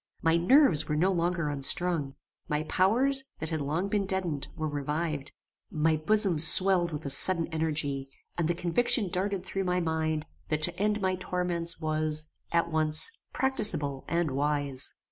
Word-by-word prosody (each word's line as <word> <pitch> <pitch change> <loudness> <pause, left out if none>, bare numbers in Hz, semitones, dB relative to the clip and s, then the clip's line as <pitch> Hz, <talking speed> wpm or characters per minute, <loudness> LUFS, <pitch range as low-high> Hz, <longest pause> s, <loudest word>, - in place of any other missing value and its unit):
My 165 0 +3
nerves 175 - +4
were 150 - -2
no 180 +5 +1
longer 170 -2 -1
unstrung. 145 +1 -1 0.3
My 150 +1 -2
powers, 250 - +2
that 160 - -5
had 160 -2 -2
long 155 +7 -2
been 200 -1 -2
deadened, 180 -7 -2
were 155 0 -3
revived. 150 0 -4 0.4
My 155 +1 0
bosom 185 +1 +1
swelled 175 +2 +5
with 150 0 -6
a 140 - -3
sudden 165 +4 +4
energy, 150 -4 -3 0.3
and 170 -2 -1
the 175 - -1
conviction 190 +4 0
darted 190 +1 -2
through 195 0 -3
my 180 0 0
mind, 160 -2 -2 0.2
that 155 0 -1
to 175 - +4
end 210 +1 0
my 185 -1 -1
torments 180 -2 -2
was, 155 -1 0 0.2
at 170 0 0
once, 155 - +5 0.2
practicable 160 - 0
and 170 -3 -1
wise. 140 -1 -1
165 Hz, 160 wpm, -28 LUFS, 150-185 Hz, 0.4 s, swelled